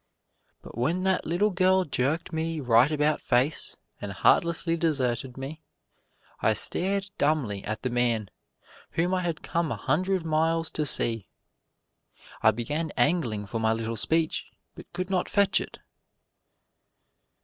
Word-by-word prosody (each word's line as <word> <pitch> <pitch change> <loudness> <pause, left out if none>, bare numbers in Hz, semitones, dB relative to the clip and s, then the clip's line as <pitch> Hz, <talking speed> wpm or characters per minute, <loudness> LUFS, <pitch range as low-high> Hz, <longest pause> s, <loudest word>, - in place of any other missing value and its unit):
But - - -9
when 165 +9 0
that 190 -1 +1
little 190 +6 +2
girl 185 0 +3
jerked 150 +5 -1
me 160 0 -2
right 125 +1 +4
about 150 0 +1
face 130 +6 +1 0.2
and 100 - -5
heartlessly 165 - +2
deserted 135 -6 -1
me, 140 +4 -7 0.8
I - - +3
stared 195 +2 -1
dumbly 135 -10 0
at 105 +2 -4
the 130 - -1
man 120 -4 0 0.6
whom 175 +3 +1
I 185 - +1
had 170 -3 -3
come 165 -3 -1
a - - -1
hundred 180 +5 0
miles 165 +1 +1
to 150 -2 -1
see. 115 -5 +1 1.1
I - - +6
began 145 +9 -2
angling 120 -6 +1
for 115 +3 -4
my 110 0 +2
little 115 0 -3
speech, 160 +8 +1 0.3
but - - -13
could 185 +1 -4
not 185 -2 0
fetch 200 -1 +3
it. - - -8
155 Hz, 140 wpm, -27 LUFS, 120-170 Hz, 1.1 s, I